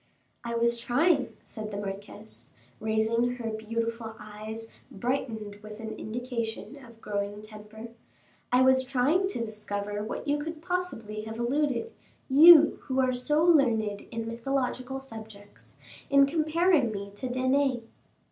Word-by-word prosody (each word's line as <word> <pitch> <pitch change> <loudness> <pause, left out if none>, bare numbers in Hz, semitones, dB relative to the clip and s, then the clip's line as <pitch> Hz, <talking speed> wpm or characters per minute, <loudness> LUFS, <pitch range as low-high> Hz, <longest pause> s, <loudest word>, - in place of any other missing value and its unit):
"I 235 0 -3
was 235 0 +2
trying," 280 +4 +2
said 215 -2 -7
the 200 - -5
marquise, 200 - -7 0.3
raising 220 +3 +1
her 230 -2 -4
beautiful 230 +1 -3
eyes 215 +1 -7 0.2
brightened 220 -3 -3
with 215 0 -10
an 220 -1 -5
indication 245 +4 -5
of 235 -2 -15
growing 205 0 -3
temper, 215 +1 -10 0.6
"I 250 +1 +5
was 260 0 +5
trying 275 +9 +2
to 390 - -4
discover 210 -2 -4
to 205 - -2
what 215 - -5
you 290 0 +1
could 315 +1 -5
possibly 330 - -3
have 220 0 -6
alluded, 285 - 0 0.3
you 315 +3 +8
who 265 -1 -1
are 255 -1 +3
so 295 +5 +1
learned 230 -11 +3
in 230 -1 -3
mythological 255 +2 -2
subjects, 220 -5 -12 0.3
in 275 0 +6
comparing 315 -2 +2
me 200 -1 -6
to 225 +6 -5
Danae." 260 0 +1
235 Hz, 140 wpm, -28 LUFS, 215-270 Hz, 0.6 s, you